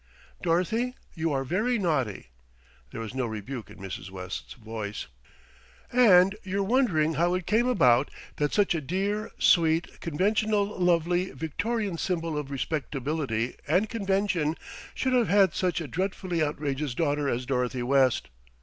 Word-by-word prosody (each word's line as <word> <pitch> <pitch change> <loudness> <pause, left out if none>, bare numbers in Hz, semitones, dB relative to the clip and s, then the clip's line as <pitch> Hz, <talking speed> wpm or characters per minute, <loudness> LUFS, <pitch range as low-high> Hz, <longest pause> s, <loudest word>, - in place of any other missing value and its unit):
"Dorothy, 220 +9 0 0.2
you 160 0 -1
are 135 -1 0
very 215 - 0
naughty." 135 - -1 0.6
There 115 - -6
was 110 0 -6
no 130 -2 -1
rebuke 110 +3 -6
in - - -13
Mrs. 95 -1 -7
West's 95 0 -7
voice. 110 -3 -6 0.9
"And 195 -6 +6
you're 195 +1 -1
wondering 195 - +2
how 175 +4 +2
it 185 -2 -3
came 230 +6 +2
about 135 - +4 0.3
that 145 -1 0
such 205 -3 +3
a 165 - -1
dear, 200 +8 -2
sweet, 165 -1 +3
conventional, 205 +5 +1
lovely, 180 -2 +1
Victorian 205 - -2
symbol 165 -4 -1
of 150 -2 -3
respectability 140 -4 -2
and 185 +8 +2
convention 195 -7 0 0.4
should 260 -1 0
have 245 -3 +3
had 195 -4 +5
such 180 -2 0
a 160 - -5
dreadfully 185 +2 -2
outrageous 145 -3 -2
daughter 145 -3 0
as 125 0 -2
Dorothy 125 -1 -1
West. 130 - +2
165 Hz, 140 wpm, -27 LUFS, 135-195 Hz, 0.9 s, And